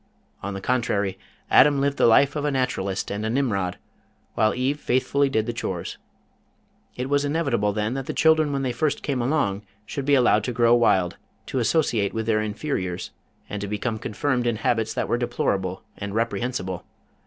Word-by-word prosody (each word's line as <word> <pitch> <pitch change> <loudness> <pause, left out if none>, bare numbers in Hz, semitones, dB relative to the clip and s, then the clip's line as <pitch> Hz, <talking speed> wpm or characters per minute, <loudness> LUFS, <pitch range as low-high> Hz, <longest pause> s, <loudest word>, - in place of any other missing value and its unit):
On 100 +1 -4
the 95 - -5
contrary 100 -5 0 0.3
Adam 145 -2 +6
lived 140 0 0
the - - +5
life 135 +6 +5
of 150 - -2
a 150 - +1
Naturalist 125 -8 -1
and 100 +1 -3
a 110 - -1
Nimrod, 100 -8 0 0.6
while 110 0 +2
Eve 135 +4 0
faithfully 140 +2 +1
did 110 -4 0
the 120 - -3
chores. 90 -6 -4 1.0
It 125 +1 -3
was 145 +1 +2
inevitable 140 -9 +1
then 105 +3 -1
that 135 0 -4
the - - -2
children 160 -2 +4
when 140 -1 -1
they 130 - 0
first 145 +5 -1
came 135 -4 -1
along, 120 -7 0 0.2
should 140 +3 -4
be 145 0 +4
allowed 120 -5 +4
to 125 - -2
grow 120 0 +4
wild, 95 -7 +3 0.3
to 130 - -2
associate 115 -6 +1
with 110 0 -1
their 110 -1 +2
inferiors, 105 -5 -3 0.4
and 105 - -5
to 100 - -3
become 110 +2 -2
confirmed 125 +3 -1
in 120 - +1
habits 110 0 0
that - - -1
were 120 - 0
deplorable 95 -6 -1
and 100 0 -5
reprehensible. 115 -5 -2
120 Hz, 185 wpm, -24 LUFS, 105-135 Hz, 1.0 s, Adam